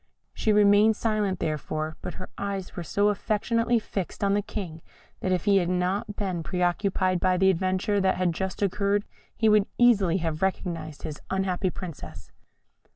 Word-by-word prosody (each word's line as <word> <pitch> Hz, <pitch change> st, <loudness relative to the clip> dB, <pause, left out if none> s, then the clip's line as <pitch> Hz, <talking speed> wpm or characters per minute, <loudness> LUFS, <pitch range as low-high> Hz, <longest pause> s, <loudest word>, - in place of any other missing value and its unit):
She 220 Hz, -, +1 dB
remained 210 Hz, +1 st, +5 dB
silent, 210 Hz, -4 st, 0 dB
therefore, 155 Hz, 0 st, -3 dB
but -, -, -6 dB
her 185 Hz, -, -8 dB
eyes 200 Hz, -2 st, -4 dB
were -, -, -4 dB
so 205 Hz, +5 st, +1 dB
affectionately 230 Hz, +3 st, +1 dB
fixed 200 Hz, -3 st, -4 dB
on 200 Hz, 0 st, +3 dB
the 205 Hz, -, +2 dB
King, 190 Hz, -6 st, -6 dB, 0.4 s
that 185 Hz, -, -1 dB
if 185 Hz, 0 st, 0 dB
he 200 Hz, -1 st, +5 dB
had 175 Hz, -2 st, +1 dB
not 190 Hz, +4 st, -1 dB
been 185 Hz, -5 st, -2 dB
pre 180 Hz, +2 st, -2 dB
occupied 185 Hz, 0 st, +1 dB
by 185 Hz, 0 st, +2 dB
the 190 Hz, +1 st, +5 dB
adventure 190 Hz, +3 st, 0 dB
that 190 Hz, 0 st, +2 dB
had 180 Hz, -2 st, +1 dB
just 190 Hz, +3 st, -3 dB
occurred, 200 Hz, +1 st, +1 dB, 0.3 s
he 220 Hz, -, +2 dB
would 210 Hz, -1 st, +4 dB
easily 205 Hz, -8 st, +4 dB
have 160 Hz, -3 st, -3 dB
recognised 170 Hz, -5 st, -2 dB
his 150 Hz, -1 st, -6 dB
unhappy 190 Hz, 0 st, 0 dB
Princess. 155 Hz, -, -9 dB
190 Hz, 170 wpm, -26 LUFS, 180-205 Hz, 0.4 s, remained